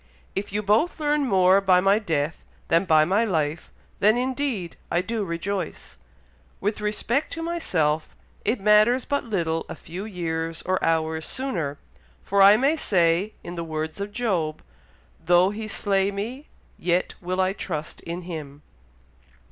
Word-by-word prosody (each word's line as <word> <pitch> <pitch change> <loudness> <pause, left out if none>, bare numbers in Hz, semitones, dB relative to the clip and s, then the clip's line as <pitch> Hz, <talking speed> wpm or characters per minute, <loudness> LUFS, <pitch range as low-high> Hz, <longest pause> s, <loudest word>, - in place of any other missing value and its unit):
If 200 +1 -3
you 210 +1 -1
both 220 - +2
learn 295 -2 +1
more 190 -2 +5
by 185 -2 +5
my 195 +3 +4
death 160 -6 -2 0.3
than 165 +3 +3
by 155 -3 +5
my 195 +7 +2
life, 160 -6 -1 0.3
then, 215 +3 +4
indeed, 255 -8 -2
I 170 - +2
do 225 +1 -2
rejoice. 185 +2 -4 0.6
With 210 +1 -2
respect 215 +6 -1
to 330 - -4
myself, 160 - 0 0.3
it 220 +2 0
matters 215 +5 +4
but 285 -2 -1
little 165 -7 -1
a - - -5
few 180 +5 -7
years 165 -4 -3
or 185 0 0
hours 160 -1 0
sooner, 175 - -3 0.5
for 200 0 +2
I 200 +2 +8
may 280 +7 +2
say, 180 - +2
in 175 - -7
the 170 -1 -4
words 160 +2 -4
of 200 +1 -4
Job, 190 -10 -1 0.6
'though 175 +3 +4
He 215 +1 -5
slay 195 -2 +1
me, 230 +9 -5 0.3
yet 175 +1 0
will 185 +1 -3
I 185 0 +2
trust 155 -6 -5
in 170 +2 -6
Him.'" 150 -4 -7
190 Hz, 155 wpm, -24 LUFS, 165-215 Hz, 0.6 s, I